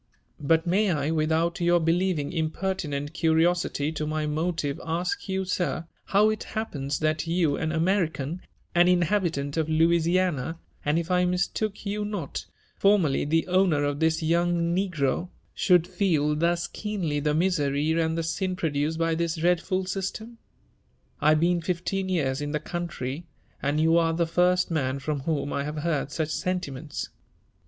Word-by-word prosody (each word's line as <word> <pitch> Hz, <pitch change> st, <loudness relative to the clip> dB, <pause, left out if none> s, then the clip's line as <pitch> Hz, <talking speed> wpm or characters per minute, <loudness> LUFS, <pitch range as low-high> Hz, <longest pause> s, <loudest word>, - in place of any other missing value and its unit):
But 160 Hz, +3 st, +2 dB
may 195 Hz, +4 st, +2 dB
I, 150 Hz, -3 st, 0 dB
without 160 Hz, +3 st, +1 dB
your 175 Hz, 0 st, +4 dB
believing 165 Hz, -2 st, 0 dB
impertinent 160 Hz, -3 st, -2 dB
curiosity 165 Hz, -2 st, +1 dB
to 155 Hz, -1 st, -3 dB
be -, -, -3 dB
my 155 Hz, 0 st, -1 dB
motive, 150 Hz, -1 st, -2 dB
ask 175 Hz, +4 st, -2 dB
you, 190 Hz, 0 st, -1 dB
sir, 180 Hz, -2 st, -1 dB, 0.2 s
how 210 Hz, +2 st, +4 dB
it 215 Hz, -, -4 dB
happens 145 Hz, -10 st, -2 dB
that 155 Hz, +1 st, 0 dB
you, 165 Hz, -3 st, +2 dB
an 160 Hz, -1 st, -2 dB
American, 165 Hz, -2 st, 0 dB, 0.3 s
an 175 Hz, 0 st, +5 dB
inhabitant 170 Hz, -5 st, +1 dB
of 160 Hz, -1 st, 0 dB
Louisiana, 165 Hz, -1 st, +2 dB, 0.3 s
and, 150 Hz, +2 st, +1 dB
if 170 Hz, +1 st, -2 dB
I 180 Hz, 0 st, +3 dB
mistook 195 Hz, +4 st, -1 dB
yoil 205 Hz, +1 st, -2 dB
not, 205 Hz, -9 st, -4 dB, 0.3 s
for 200 Hz, +1 st, +5 dB
merly 145 Hz, -5 st, 0 dB
the 165 Hz, +2 st, +2 dB
owner 180 Hz, -5 st, +3 dB
of 145 Hz, 0 st, -1 dB
this 160 Hz, 0 st, +1 dB
young 170 Hz, +1 st, +1 dB
negro, 175 Hz, -3 st, 0 dB, 0.2 s
should 180 Hz, -3 st, +4 dB
feel 175 Hz, -5 st, +1 dB
thus 170 Hz, +2 st, +1 dB
keenly 175 Hz, -7 st, -3 dB
thd 150 Hz, +1 st, +1 dB
misery 155 Hz, -4 st, +1 dB
and 160 Hz, 0 st, +1 dB
the 165 Hz, -, 0 dB
sin 185 Hz, +3 st, -2 dB
produced 155 Hz, -1 st, -1 dB
by 165 Hz, 0 st, +1 dB
this 165 Hz, 0 st, -1 dB
dreadful 180 Hz, +3 st, +1 dB
system? 200 Hz, +5 st, -5 dB, 0.8 s
I 150 Hz, -, +3 dB
have 155 Hz, 0 st, +5 dB
been 175 Hz, +1 st, +2 dB
fifteen 180 Hz, +3 st, -2 dB
years 145 Hz, -6 st, 0 dB
in 145 Hz, +1 st, -3 dB
the 150 Hz, -, 0 dB
country, 165 Hz, -3 st, -5 dB, 0.3 s
and 145 Hz, +2 st, 0 dB
you 165 Hz, +2 st, +4 dB
are 165 Hz, -1 st, +2 dB
the 170 Hz, +1 st, +1 dB
first 180 Hz, +2 st, +2 dB
man 140 Hz, -4 st, 0 dB
from 145 Hz, +1 st, -2 dB
whom 145 Hz, 0 st, -2 dB
I 140 Hz, -, -1 dB
have 150 Hz, +2 st, -5 dB
heard 150 Hz, -4 st, -1 dB
such 160 Hz, -1 st, -2 dB
sentiments." 155 Hz, -5 st, -3 dB
165 Hz, 165 wpm, -26 LUFS, 150-180 Hz, 0.8 s, an